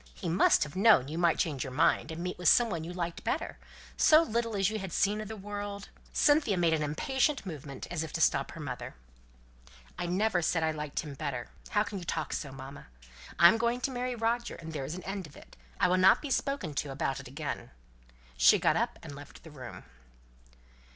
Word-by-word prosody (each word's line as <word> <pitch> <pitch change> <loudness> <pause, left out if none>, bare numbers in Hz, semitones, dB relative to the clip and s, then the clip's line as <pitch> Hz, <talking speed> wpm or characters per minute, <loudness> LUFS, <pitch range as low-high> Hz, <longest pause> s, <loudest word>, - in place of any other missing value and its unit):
He - - -6
must 170 - +4
have 150 - -8
known 195 - +5
you 160 +2 -4
might 170 -2 +3
change 145 -6 -1
your 135 - -6
mind, 150 +2 +2
and 165 +1 -5
meet 180 0 -4
with 180 - +4
some 235 -2 +5
one 165 -3 -3
you 170 - -6
liked 175 -1 -4
better: - - -2 0.4
so 310 +1 +6
little 230 -4 -1
as 195 -2 +2
you 215 +1 -2
had 190 -2 -6
seen 205 +5 +1
of 215 - -6
the 220 - -6
world." 205 0 -6 0.2
Cynthia 290 -9 +3
made 170 -2 +3
an 160 - 0
impatient 265 - 0
movement, 145 -6 -7
as 170 -2 -1
if 160 - -7
to - - -2
stop - - +2
her - - -9
mother. - - -6 1.0
"I 175 - -2
never 185 +1 +1
said 165 0 +1
I 160 - +2
liked 150 -2 -4
him 150 -4 -8
better, 135 -4 -4 0.2
how 210 - +2
can 205 -2 -6
you - - -8
talk 160 -2 -3
so, 140 - -4
mamma? 135 +1 -10 0.5
I'm 175 +6 +7
going 235 +1 +1
to 270 - -1
marry 250 0 -2
Roger, 235 +1 -1
and 160 -1 -9
there's 145 +2 -4
an 185 - -8
end 195 -3 -5
of 145 - -16
it. - - -15 0.2
I - - +4
will 180 +1 +2
not 185 +1 +6
be 290 - -6
spoken 275 - -1
to 145 - -8
about 135 0 -2
it 140 - -9
again." 145 +4 -5 0.7
She - - +6
got - - +2
up - - -1
and - - -8
left 145 0 -12
the 160 - -12
room. 130 -4 -9
175 Hz, 220 wpm, -30 LUFS, 150-215 Hz, 1.0 s, I'm